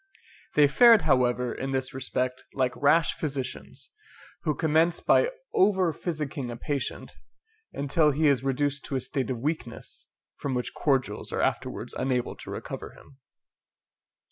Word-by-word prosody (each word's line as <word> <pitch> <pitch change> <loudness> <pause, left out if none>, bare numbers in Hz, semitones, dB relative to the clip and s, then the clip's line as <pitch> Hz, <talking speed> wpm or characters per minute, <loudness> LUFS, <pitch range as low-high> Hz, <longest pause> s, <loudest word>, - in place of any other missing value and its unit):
They 150 -1 +7
fared, 230 - +7
however, 125 -4 +2
in 135 +1 -4
this 130 0 -2
respect, 130 -1 -2
like 130 -2 0
rash 150 +2 +3
physicians, 135 -4 -5 0.5
who 150 - 0
commence 165 +2 +2
by 485 - +4 0.2
over 190 -4 +3
physicking 150 -6 -4
a 120 - -6
patient, 140 +3 -4 0.6
until 150 +3 +2
he 150 +2 +1
is 140 -3 +3
reduced 140 +1 0
to 140 - -4
a - - +1
state 135 +1 -3
of 130 - -1
weakness, 120 -2 -5 0.3
from 135 -2 -3
which 125 - -2
cordials 135 -4 0
are - - -1
afterwards - - -2
unable 125 -2 -1
to - - -10
recover - - -6
him. 135 - -18
140 Hz, 145 wpm, -27 LUFS, 130-155 Hz, 0.6 s, They